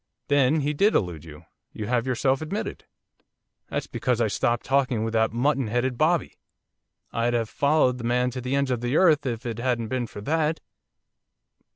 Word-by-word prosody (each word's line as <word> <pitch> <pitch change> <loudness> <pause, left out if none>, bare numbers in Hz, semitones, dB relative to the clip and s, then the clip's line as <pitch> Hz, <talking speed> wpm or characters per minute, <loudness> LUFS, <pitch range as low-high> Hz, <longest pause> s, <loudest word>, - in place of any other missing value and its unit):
'That 140 -1 +4
he 150 +2 0
did 200 +8 +3
elude 85 -5 -1
you, 80 0 -12 0.3
you 105 - -5
have 120 +3 0
yourself 130 +2 +1
admitted.' 165 +7 -4 0.8
'That's - - -2
because 125 -3 -1
I 115 -2 +2
stopped 120 +3 0
talking 130 -5 +1
with 115 0 -3
that 110 0 +2
mutton 130 +2 +1
headed 120 +3 0
bobby, 160 +5 0 0.7
I'd 120 +1 +1
have 115 -2 -1
followed 140 -4 +2
the - - -7
man 125 +1 +1
to 125 +1 -5
the 130 +2 -2
ends 140 -1 +1
of 120 -2 -1
the 120 +5 0
earth 155 -7 +4
if 120 0 -4
it 115 -1 -4
hadn't 120 -2 -1
been 125 -1 -2
for 105 - -9
that. 155 +5 0
125 Hz, 185 wpm, -25 LUFS, 115-140 Hz, 0.8 s, That